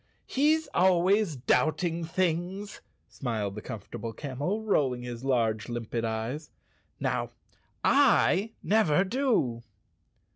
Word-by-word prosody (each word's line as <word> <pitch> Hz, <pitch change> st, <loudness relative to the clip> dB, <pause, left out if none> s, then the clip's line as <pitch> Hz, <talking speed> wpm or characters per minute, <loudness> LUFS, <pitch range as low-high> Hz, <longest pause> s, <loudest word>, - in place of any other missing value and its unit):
"He's 310 Hz, +4 st, +2 dB
always 185 Hz, 0 st, +3 dB
doubting 160 Hz, +6 st, +1 dB
things," 185 Hz, +4 st, -2 dB, 0.3 s
smiled 110 Hz, -6 st, -3 dB
the 105 Hz, -, -7 dB
Comfort¬ 110 Hz, -4 st, -8 dB
able 115 Hz, -1 st, -5 dB
Camel, 145 Hz, -, -3 dB
rolling 130 Hz, -, +1 dB
his 120 Hz, 0 st, -6 dB
large, 115 Hz, -5 st, 0 dB
limpid 120 Hz, -1 st, -3 dB
eyes. 115 Hz, +7 st, -3 dB, 0.5 s
"Now, -, -, -1 dB, 0.5 s
I 225 Hz, -6 st, +4 dB
never 190 Hz, -5 st, +3 dB
do." 200 Hz, -, 0 dB
155 Hz, 105 wpm, -28 LUFS, 120-200 Hz, 0.5 s, I